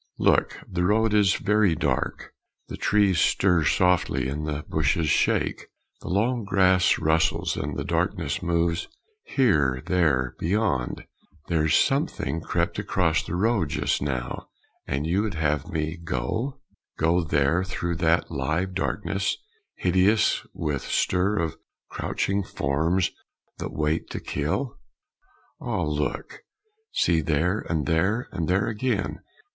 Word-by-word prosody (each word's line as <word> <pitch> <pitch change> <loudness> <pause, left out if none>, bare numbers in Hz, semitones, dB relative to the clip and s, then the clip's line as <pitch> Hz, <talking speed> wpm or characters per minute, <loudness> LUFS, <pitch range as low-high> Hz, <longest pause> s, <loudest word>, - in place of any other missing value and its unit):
Look! - - +2
the 90 -1 -2
road 110 +3 +2
is 100 -2 +4
very 105 -4 +2
dark 65 -5 -2 0.4
The - - -5
trees 100 -5 +2
stir 90 -2 +3
softly 80 -6 +2
and 75 +3 -3
the 75 0 -3
bushes 80 +1 +1
shake, - - +1 0.3
The - - -10
long 115 +6 +1
grass 95 -2 +3
rustles, 80 0 +1
and 70 0 -4
the - - -2
darkness - - -1
moves 85 0 0 0.4
Here! 75 - +2
there! 70 -9 +1
beyond! 85 - -1 0.4
There's 80 -2 +2
something 135 - +1
crept 85 +1 -1
across 85 -4 +1
the 85 - -4
road 100 -4 +1
just - - 0
now! 65 -3 -3 0.4
And 70 +3 -1
you 90 +5 +1
would 105 -5 -2
have 75 -2 0
me 80 +1 -3
go? 85 - -3 0.4
Go 85 +3 +2
there, 75 +3 +2
through 85 -3 -3
that 80 0 +1
live 80 +6 -1
darkness, 100 +1 -1 0.4
hideous 95 +4 +2
With 75 -4 -2
stir 100 +4 +1
of 80 -4 -1 0.3
crouching 100 +1 -1
forms 80 +5 0 0.5
that - - -4
wait 75 +1 -1
to - - -4
kill? 110 - -3 0.8
Ah, 105 -7 -2
look! 75 -1 -3 0.5
See 85 -2 +2
there! 80 +6 +1
and 80 -4 0
there! 95 - +1
and 80 -2 -3
there 95 +3 +2
again! 115 -1 -1
85 Hz, 130 wpm, -25 LUFS, 75-100 Hz, 0.8 s, is